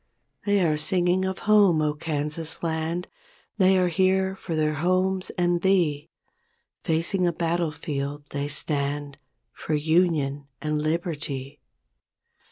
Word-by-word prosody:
1 205 -1 +2
9 190 -3 +3
They - - +4
are 155 -1 +1
singing 180 +4 +1
of 190 0 -2
home, 205 -5 +5
0, 150 -1 +1
Kansas 150 +1 -3
land! 165 +2 -2 0.5
They 190 0 +5
are 180 -1 +3
here 190 +2 +2
for 175 -3 -5
their 155 -1 +1
homes 185 +4 0
and 175 -1 +1
thee; 175 -7 +1 0.7
Facing 170 +3 +1
a - - +2
battlefield 150 -4 -2
they 140 0 -2
stand 145 -1 -2 0.3
For 155 - -3
"Union 150 -3 +1
and 150 0 -1
Liberty''. 150 -4 -3
160 Hz, 130 wpm, -25 LUFS, 150-180 Hz, 0.7 s, home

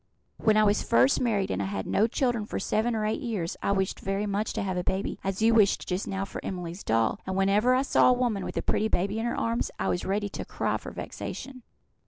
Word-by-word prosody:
When 215 -1 +3
I 215 - +5
was 205 0 +3
first 125 +3 +3
married 215 -6 +1
I 95 +1 -1
had 95 0 -3
no 215 - +2
children 240 -3 0
for - - -4
seven 220 +4 0
or 215 -1 -1
eight 215 - -1
years; 205 -9 -3
I - - 0
wished 190 -1 0
very 195 +2 -2
much 205 +1 -1
to - - -2
have 190 -1 -2
a 180 - -1
baby, 190 +2 -2
as 195 +2 -2
you 230 +1 +5
wished 210 -3 +3
just 180 +2 -2
now 195 0 -2
for - - -8
Emily's 180 0 -5
doll; 115 0 +1
and 190 - -2
whenever 205 +6 +3
I 260 - +2
saw 275 - +4
a - - +6
woman 240 -6 0
with - - -5
a - - -1
pretty 215 - +1
baby 200 +2 0
in 230 - -1
her - - -2
arms, 230 +1 0
I - - -1
was 180 - -1
ready 205 +2 -1
to - - -6
cry - - -1
for - - -8
vexation." 260 -2 -7
200 Hz, 250 wpm, -27 LUFS, 190-225 Hz, -, a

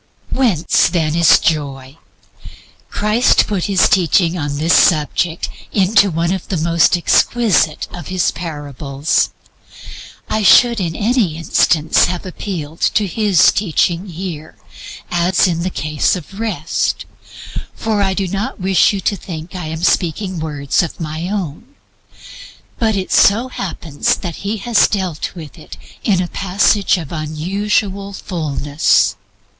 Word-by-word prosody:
Whence, 220 - +2
then, 160 -4 0
is 170 -1 +5
joy? 140 -2 -3 0.9
Christ 210 +4 +2
put 195 -4 -2
His 195 -3 +3
teaching 175 -1 +2
upon 145 -4 -3
this 160 +4 +2
subject 165 +1 +2 0.2
into 200 0 +3
one 170 +1 -1
of 190 - -5
the 185 - -2
most 170 +2 +3
exquisite 185 -3 +2
of 175 -4 -8
His 185 -1 0
parables. 145 -2 -2 1.0
I 215 - -1
should 235 +3 +5
in 170 -4 -3
any 215 -7 0
instance 160 -1 +2
have 180 0 -4
appealed 170 -4 -6
to 210 - +2
His 200 -1 +3
teaching 180 -1 0
here, 170 -3 -7 0.6
as 175 +2 +2
in 170 -2 -1
the 185 - -1
case 155 -1 0
of 185 +3 -9
Rest, 195 -9 -2 0.7
for 220 -2 -1
I 190 -1 0
do 195 -1 -1
not 200 +4 -4
wish 190 +1 +3
you 195 - -3
to 200 - 0
think 170 -2 -8
I 180 -4 -5
am 160 +1 -5
speaking 180 +1 0
words 145 -2 -1
of 170 - -5
my 160 +2 -4
own. 200 - -5 1.0
But 220 -2 +1
it 190 -1 -3
so 230 +6 +4
happens 165 - -2
that 170 -4 -6
He 205 +3 -3
has 220 +1 +3
dealt 185 -4 -3
with 160 -1 -10
it 155 - -11 0.3
in 185 -4 +1 0.2
words 195 +1 +2
of 160 -5 -7
unusual 195 +5 -2
fullness. 145 - 0
175 Hz, 135 wpm, -17 LUFS, 155-200 Hz, 1.0 s, is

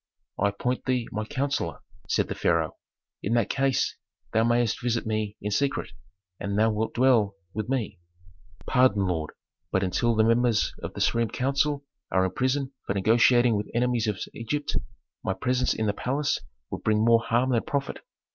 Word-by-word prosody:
"I 100 - +3
appoint 125 +5 -2
thee 125 -3 0
my 110 0 -3
counsellor," 140 +4 -2 0.3
said - - +2
the - - -3
pharaoh. - - +1 0.5
"In 105 - -1
that 115 -3 +2
case 135 -2 +1 0.4
thou 110 - +4
mayst 120 0 +1
visit 120 -2 0
me 110 -1 -2
in 105 - -2
secret, 140 +6 0 0.5
and 100 0 -2
thou 110 +1 +4
wilt 110 +1 -2
dwell 120 -6 +3 0.2
with 110 +2 -4
me." 115 -8 -2 0.7
"Pardon, 115 -7 +3
lord, 80 -4 -1 0.4
but 95 - +1
until 115 +6 +1
the 110 - +4
members 115 -1 +2
of - - -6
the - - -4
supreme 115 -1 +2
council 140 +2 0 0.3
are 95 0 +3
in 95 - -1
prison 130 +5 -1
for 100 - -1
negotiating 115 +3 +4
with 105 0 -2
enemies 120 -1 +1
of 105 -2 -1 0.2
Egypt, 145 +6 -3 0.5
my - - -1
presence 125 0 +1
in 110 - -1
the 105 - +1
palace 140 +6 -1 0.3
would - - -4
bring 110 0 +2
more 115 0 +5
harm 120 +3 +1
than 115 -2 +3
profit. 140 -1 -3
115 Hz, 175 wpm, -26 LUFS, 105-130 Hz, 0.7 s, more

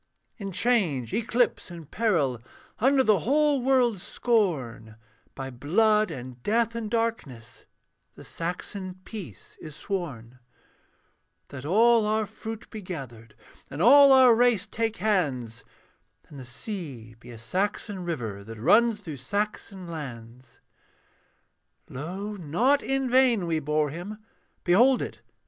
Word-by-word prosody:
In 200 -4 -6
change, 180 - 0
eclipse, 230 -1 0
and 170 -4 -11
peril, 160 - 0 0.4
Under 265 +3 +4
the 215 -5 +3
whole 290 - +2
world's 245 -6 +2
scorn, 140 - -1 0.4
By 135 -1 -6
blood 210 - +2
and 125 -1 -8
death 230 - +1
and 230 -2 -4
darkness 145 - -3 0.5
The - - -13
Saxon 185 +2 -5
peace 175 - -9
is 155 -3 -9
sworn; 130 - -5 1.1
That 140 -1 -9
all 225 +5 +4
our 215 0 +1
fruit 220 +2 -8
be 215 - -7
gathered, 125 - -9 0.3
And 140 - -7
all 275 - +8
our 260 -2 +7
race 235 -4 +3
take 225 -1 -2
hands, 140 - -1 0.7
And 145 - -11
the 130 - -9
sea 130 - -7
be 125 - -14
a 120 - -10
Saxon 190 - -2
river 115 -13 -4
That 115 +2 -10
runs 220 - +3
through 160 -7 -7
Saxon 195 +5 -4
lands. 125 -6 -9 1.3
Lo! 185 +10 -6
not 225 - +1
in 270 -1 -1
vain 250 -6 +3
we 165 -2 0
bore 150 0 0
him; 180 +7 -7 0.5
Behold 240 +9 +4
it! 110 - -8
185 Hz, 125 wpm, -26 LUFS, 135-225 Hz, 1.3 s, all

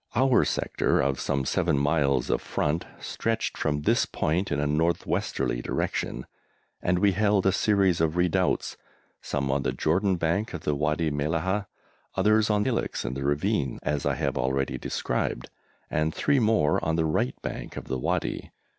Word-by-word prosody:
Our 130 0 +4
sector - - 0
of 65 0 +1
some 70 -1 -1
seven 70 - +1
miles 70 -1 +1
of - - +1
front 75 +3 -1
stretched 115 0 -2
from 75 -1 -1
this - - +2
point 90 +6 -1
in 70 - 0
a 75 - +1
north 80 +4 +1
westerly - - -1
direction, 60 - -2 0.6
and 90 0 +1
we 100 +2 +4
held 100 0 +2
a 95 - +5
series 95 -3 +2
of 80 +1 +1
redoubts, 90 +1 +1 0.4
some 70 -1 -2
on 70 +1 +1
the - - -1
Jordan 95 +5 +1
bank 90 +5 -1
of 85 - -6
the 75 - 0
Wadi 75 +2 0
Mellahah, 80 +8 -1 0.5
others 105 +2 +3
on 105 -1 +2
hillocks 125 - -1
in 60 - -2
the 70 +1 -4
ravine, 75 - 0
as 75 -2 -1
I - - +1
have - - -1
already 65 +2 -1
described, - - -2 0.4
and 80 +1 0
three 140 - +2
more 110 -10 +2
on 80 - +1
the 80 -1 +1
right 75 -5 0
bank - - -6
of - - -6
the 65 0 -3
Wadi. - - -2
80 Hz, 170 wpm, -27 LUFS, 70-100 Hz, 0.6 s, a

